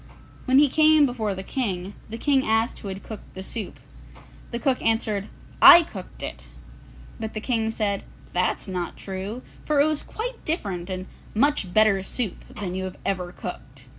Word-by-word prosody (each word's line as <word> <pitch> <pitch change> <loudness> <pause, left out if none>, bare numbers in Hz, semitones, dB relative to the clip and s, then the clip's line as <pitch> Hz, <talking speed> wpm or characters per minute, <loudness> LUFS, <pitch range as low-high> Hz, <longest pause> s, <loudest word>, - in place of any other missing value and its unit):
When 260 0 +4
he 290 +1 +7
came 310 +1 +5
before 220 -6 -2
the 190 - -6
King, 195 -6 -3 0.2
the 225 - -5
King 270 +1 +2
asked 225 +1 +1
who - - -8
had 190 0 -6
cooked 220 -3 -10
the 190 - -5
soup. 210 0 -6 0.7
The 235 - -2
cook 260 0 +1
answered, 220 -3 0 0.3
'I 345 - +11
cooked - - -9
it.' - - -6 0.7
But 220 0 -5
the - - -1
King 225 -1 0
said, 210 -3 -1 0.3
'That's 180 +3 0
not 180 -2 -4
true, 195 +5 -5 0.2
for 300 -2 +1
it 285 - +6
was 310 -1 +1
quite 480 +2 -6
different 195 - -3
and 185 0 -4 0.3
much 270 -6 +2
better 215 -1 +4
soup 205 +1 -2
than 195 -4 -4
you 190 0 -3
have 185 - -7
ever 180 -2 -1
cooked. 135 -8 -9
215 Hz, 175 wpm, -25 LUFS, 190-260 Hz, 0.7 s, I